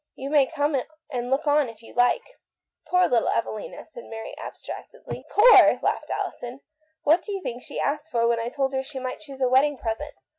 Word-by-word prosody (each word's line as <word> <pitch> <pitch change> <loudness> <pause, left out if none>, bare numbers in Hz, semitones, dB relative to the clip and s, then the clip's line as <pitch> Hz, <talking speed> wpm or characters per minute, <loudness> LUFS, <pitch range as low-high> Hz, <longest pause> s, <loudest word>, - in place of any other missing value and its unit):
You 270 +2 -6
may 285 -3 +5
come 295 -1 0 0.4
and 245 -2 -3
look 270 +4 +1
on 290 -3 +3
if 230 0 -14
you - - -14
like." 245 - +3 0.3
" - - -36
Poor 360 0 +4
little 235 -2 +2
Evelina," 215 -2 -3
said 240 -7 -12
Mary 225 0 -7
abstract - - -8
edly. - - -8
" - - -23
Poor! 460 +4 +7
" - - -28
laughed - - -1
Alison. 245 +3 -4 0.2
" 315 +1 -44
What 320 +4 +4
do 420 - -7
you 395 - -2
think 245 +1 -5
the - - -10
girl - - 0
asked 295 +2 -2
for 235 -4 +1
when 235 0 +2
I 230 +1 -2
told 270 +1 -1
her 265 - 0
she 270 +1 -9
might 255 -1 -4
choose 275 -3 -11
a 255 - +4
wedding 275 +3 +3
present 255 +6 -4
270 Hz, 235 wpm, -25 LUFS, 245-300 Hz, 0.4 s, Poor